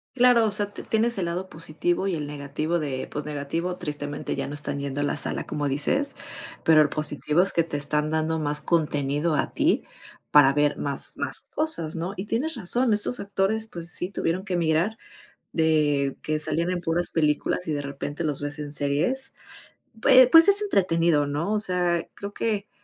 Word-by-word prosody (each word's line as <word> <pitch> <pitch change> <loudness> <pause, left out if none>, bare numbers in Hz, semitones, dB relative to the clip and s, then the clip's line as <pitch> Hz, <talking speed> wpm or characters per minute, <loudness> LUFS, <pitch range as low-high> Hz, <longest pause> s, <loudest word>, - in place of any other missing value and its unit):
Claro, 245 -2 +5
o 215 - 0
sea, 205 0 -1
te - - -9
tienes 225 0 0
el 185 - -1
lado 180 +2 -4
positivo 165 +3 -2
y 190 - -1
el 150 -3 -3
negativo 145 +3 -3
de 140 -5 -4
pues 150 - -5
negativo, 150 +5 -3
tristemente 145 -3 -4
ya - - -3
no 145 - -6
están 145 -1 -2
yendo 140 0 -3
a - - +1
la 145 - -1
sala - - +2
como 145 -1 -2
dices, 150 - 0 0.5
pero 155 -1 +6
lo 150 - -1
positivo 150 +1 0
es 195 - +2
que 170 - +2
te 160 -3 -5
están 150 +1 -1
dando 160 0 0
más 150 -1 +4
contenido 150 -1 0
a - - -1
ti - - +1 0.5
para 140 -2 +6
ver 145 0 +1
más 140 -1 -3
más - - +3
cosas, 300 - +2
¿no? 170 +4 -4
Y 190 +2 -6
tienes 285 +10 -1
razón, 235 +3 +2
estos 210 +4 -1
actores 200 +2 -1
pues 170 -5 -7
sí 180 - -2
tuvieron 185 0 -2
que 190 -3 -2
migrar 170 +6 0 0.5
de 150 -4 +1
que 155 0 -1
salían 170 +3 -1
en 180 -1 -2
puras 170 +1 -1
películas 155 +2 0
y 155 - 0
de 145 - -3
repente 145 +3 -5
los 150 -3 -1
ves 145 +1 -5
en 145 -1 -6
series, 155 - -1 0.7
pue 255 +2 +7
pues 330 0 +8
es 405 +1 +6
entretenido, 165 - +2
¿no?, 150 +7 -2
o 215 - +1
sea, 180 -4 0
creo 200 0 -7
que 210 -2 -2
165 Hz, 195 wpm, -25 LUFS, 145-195 Hz, 0.7 s, pues